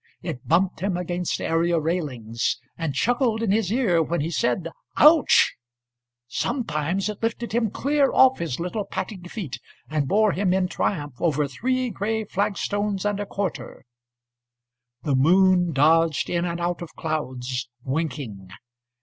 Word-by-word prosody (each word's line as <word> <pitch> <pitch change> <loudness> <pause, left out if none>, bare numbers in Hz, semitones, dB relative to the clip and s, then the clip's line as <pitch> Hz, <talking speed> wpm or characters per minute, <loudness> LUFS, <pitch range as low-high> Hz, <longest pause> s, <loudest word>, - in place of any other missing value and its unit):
It 155 -8 -6
bumped 180 +2 +2
him 185 0 -1
against 180 0 -2
area 165 +1 +1
railings, 135 -9 -2 0.2
And 160 -5 -3
chuckled 240 - +1
in 210 - +1
his 210 -2 +1
ear 215 -9 +2
when 170 +2 -1
he 160 +3 -2
said 145 +4 0 0.3
âOuch!âSometimes 125 - +1
it 210 -1 -5
lifted 230 +1 -2
him 230 -1 +1
clear 280 +5 +1
off 265 0 +5
his 165 -6 -3
little 180 +5 -2
patting 190 -1 -5
feetAnd 155 - -5
bore 215 +3 +3
him 185 -1 +1
in 190 -1 +1
triumph 145 -8 -3
over 150 -3 +1
three 255 - -1
grey 220 +2 -2
flagstones 205 0 -1
and 205 -1 0
a 205 - -3
quarter. 195 -8 -4 1.2
The 145 -3 +1
moon 180 +4 +4
dodged 160 +1 +3
in 175 0 0
and 170 0 -3
out 175 0 -2
of 170 - -8
clouds, 130 -6 -3
winking. 130 - -4
175 Hz, 140 wpm, -24 LUFS, 145-205 Hz, 1.2 s, off